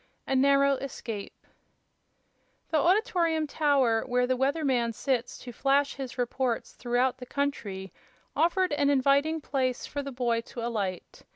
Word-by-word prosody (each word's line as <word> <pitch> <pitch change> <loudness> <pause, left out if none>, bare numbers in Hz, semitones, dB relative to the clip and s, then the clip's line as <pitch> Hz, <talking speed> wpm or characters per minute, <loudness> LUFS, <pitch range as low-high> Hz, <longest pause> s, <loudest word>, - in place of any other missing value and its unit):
A 270 - -1
Narrow 275 +1 +4
Escape 230 -6 -7 1.3
The 315 - +3
Auditorium 335 -3 +2
Tower, 275 -7 +2
where 250 0 +2
"the 255 +1 +1
weather 280 +5 0
man" 240 -4 +1
sits 245 +1 -2
to 245 - -9
flash 275 +3 +1
his 265 -2 -7
reports 245 -1 -1
throughout 245 +1 0
the 250 - -9
country, 205 - -3 0.4
offered 365 0 +2
an 290 -1 +2
inviting 280 +3 +2
place 260 -3 -1
for 285 - -4
the 275 0 -6
boy 240 -2 0
to 230 0 -7
alight. 200 -6 -4
265 Hz, 145 wpm, -28 LUFS, 240-285 Hz, 1.3 s, Narrow